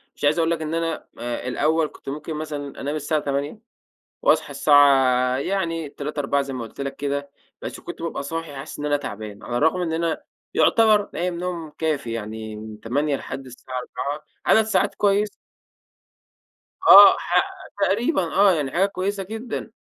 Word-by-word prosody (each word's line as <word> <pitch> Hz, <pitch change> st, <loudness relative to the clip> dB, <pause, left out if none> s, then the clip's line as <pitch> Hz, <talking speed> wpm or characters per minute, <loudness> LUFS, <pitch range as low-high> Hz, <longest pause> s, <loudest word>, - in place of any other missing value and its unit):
مش -, -, -14 dB
عايز 145 Hz, +3 st, +3 dB
أقول 165 Hz, 0 st, +2 dB
لك 165 Hz, -1 st, -1 dB
إن 155 Hz, 0 st, -3 dB
أنا، 165 Hz, -1 st, -2 dB
آآ، 120 Hz, +1 st, -4 dB
الأول 155 Hz, +5 st, +1 dB
كنت -, -, -11 dB
ممكن 150 Hz, +3 st, -5 dB
مثلًا 150 Hz, -2 st, -6 dB
أنام 145 Hz, +2 st, -2 dB
الساعة 155 Hz, 0 st, -1 dB
20:00 140 Hz, +7 st, -3 dB, 0.6 s
وأصحى -, -, +3 dB
الساعة 135 Hz, -3 st, +4 dB
يعني 165 Hz, 0 st, -2 dB
03:00 145 Hz, +1 st, -5 dB
04:00 140 Hz, 0 st, +1 dB
زي 135 Hz, -, -6 dB
ما 130 Hz, -2 st, -4 dB
قُلت 115 Hz, -, -11 dB
لك 140 Hz, 0 st, -4 dB
كده، 140 Hz, 0 st, -3 dB, 0.3 s
بس -, -, -6 dB
كنت -, -, -8 dB
بابقى 165 Hz, -4 st, -3 dB
صاحي 165 Hz, +1 st, -5 dB
حاسس 140 Hz, +3 st, -8 dB
إن 145 Hz, -, -3 dB
أنا 145 Hz, 0 st, +2 dB
تعبان، 105 Hz, -6 st, -7 dB
على 120 Hz, -, -4 dB
الرغم 160 Hz, +6 st, +2 dB
إن 165 Hz, -2 st, -2 dB
أنا 165 Hz, 0 st, -1 dB, 0.3 s
يُعتبر 215 Hz, -3 st, +4 dB
نايم 180 Hz, 0 st, -2 dB
نوم 175 Hz, -3 st, -4 dB
كافي 145 Hz, -7 st, -1 dB
يعني، 110 Hz, -1 st, -5 dB
من 110 Hz, 0 st, -9 dB
20:00 140 Hz, +5 st, 0 dB
لحد 135 Hz, 0 st, -7 dB
الساعة 130 Hz, +1 st, -9 dB
04:00 145 Hz, +4 st, -5 dB, 0.2 s
عدد 220 Hz, -, +6 dB
ساعات 220 Hz, -, +1 dB
كويسة. 205 Hz, 0 st, +2 dB, 1.5 s
آه -, -, +10 dB
ح -, -, +2 dB, 0.4 s
تقريبًا 220 Hz, -, +2 dB
آه، 195 Hz, +3 st, +4 dB
يعني 145 Hz, -6 st, -1 dB
حاجة 185 Hz, +6 st, +2 dB
كويسة 200 Hz, 0 st, -3 dB
جدًا، 220 Hz, +3 st, -6 dB
150 Hz, 170 wpm, -23 LUFS, 135-170 Hz, 1.5 s, آه